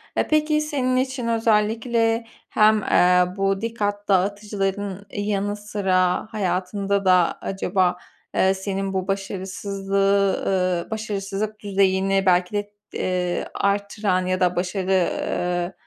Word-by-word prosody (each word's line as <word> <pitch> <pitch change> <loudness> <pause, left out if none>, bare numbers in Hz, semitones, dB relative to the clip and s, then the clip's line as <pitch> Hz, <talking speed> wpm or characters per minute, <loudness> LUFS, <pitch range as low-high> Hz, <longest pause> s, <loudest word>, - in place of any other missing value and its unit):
E, - - +1
peki, 305 0 +2
senin 270 -4 -1
için 260 -2 -1
özellikle 225 +1 +1 0.2
hem, 215 -1 +4
eee, 180 0 +4
bu 195 0 0
dikkat 205 -3 -2
dağıtıcıların 200 0 -1
yanı 205 0 -1
sıra 195 -2 0
hayatında 195 0 -1
da 180 -2 +4
acaba, 190 -2 0 0.4
eee, 190 0 +4
senin 195 0 -3
bu 190 -1 -2
başarısızlığı, 195 0 0
ııı, 185 -1 0
başarısızlık 210 0 -3
düzeyini 195 -1 +1
belki 180 +1 +3
de, 205 0 -2 0.2
eee, 180 -1 -1
arttıran 200 -2 0
ya 185 0 0
da 180 -1 +2
başarı, 185 0 0 0.2
ııı, 175 +1 -2
195 Hz, 115 wpm, -23 LUFS, 185-210 Hz, 0.4 s, hem